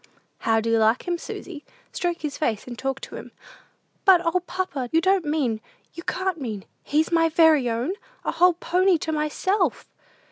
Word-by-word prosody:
"How 225 Hz, 0 st, +2 dB
do 230 Hz, +1 st, -1 dB
you 225 Hz, -, +3 dB
like 220 Hz, +8 st, +2 dB
him, 345 Hz, -1 st, -1 dB
Susy? 310 Hz, -4 st, -8 dB, 0.3 s
Stroke 350 Hz, -1 st, -2 dB
his 295 Hz, -2 st, -3 dB
face, 225 Hz, -9 st, -1 dB
and 245 Hz, -, -7 dB
talk 270 Hz, +2 st, -3 dB
to -, -, -8 dB
him." -, -, -10 dB, 0.7 s
"But, 380 Hz, -2 st, +7 dB
O, 335 Hz, +2 st, +2 dB
papa, 355 Hz, -8 st, -4 dB
you 325 Hz, -, +4 dB
don't 375 Hz, 0 st, +2 dB
mean, 275 Hz, -8 st, 0 dB, 0.3 s
you 335 Hz, -, -8 dB
can't 370 Hz, -2 st, -2 dB
mean, 215 Hz, -6 st, -5 dB, 0.2 s
he's 310 Hz, +3 st, 0 dB
my 330 Hz, -1 st, +3 dB
very 315 Hz, -6 st, +4 dB
own! 235 Hz, +10 st, -1 dB, 0.3 s
A -, -, +1 dB
whole 355 Hz, +2 st, +4 dB
pony 365 Hz, +3 st, +2 dB
all -, -, +4 dB
to 320 Hz, -, -3 dB
myself!" 315 Hz, +6 st, 0 dB
320 Hz, 185 wpm, -24 LUFS, 255-355 Hz, 0.7 s, But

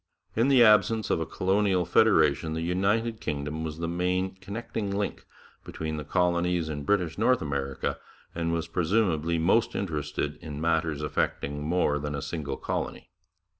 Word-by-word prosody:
In 115 Hz, +3 st, +3 dB
the 135 Hz, -3 st, +6 dB
absence 110 Hz, -1 st, +4 dB
of -, -, +2 dB
a 80 Hz, -, -3 dB
colonial 95 Hz, -1 st, +1 dB
federation 80 Hz, -6 st, +3 dB
the 80 Hz, -, -2 dB
United 105 Hz, +6 st, 0 dB
Kingdom 75 Hz, +2 st, -3 dB
was 80 Hz, -1 st, -4 dB
the 85 Hz, 0 st, -3 dB
main 90 Hz, +2 st, 0 dB
connecting 100 Hz, +1 st, -5 dB
link 100 Hz, +1 st, -3 dB, 0.4 s
between 80 Hz, -1 st, -5 dB
the 75 Hz, -, -4 dB
colonies 90 Hz, +1 st, +1 dB
in 75 Hz, -2 st, -4 dB
British 90 Hz, -3 st, 0 dB
North 125 Hz, +3 st, +4 dB
America, 70 Hz, -2 st, -3 dB, 0.3 s
and 85 Hz, -1 st, -1 dB
was 85 Hz, -1 st, -1 dB
presumably 85 Hz, -2 st, +1 dB
most 95 Hz, +8 st, +2 dB
interested 75 Hz, -4 st, -3 dB
in 75 Hz, -2 st, -7 dB
matters 80 Hz, -2 st, 0 dB
affecting 75 Hz, -1 st, -2 dB
more 75 Hz, -2 st, +1 dB
than 75 Hz, 0 st, -3 dB
a 70 Hz, -, -3 dB
single 75 Hz, -4 st, -4 dB
colony. -, -, -4 dB
85 Hz, 155 wpm, -27 LUFS, 75-100 Hz, 0.4 s, the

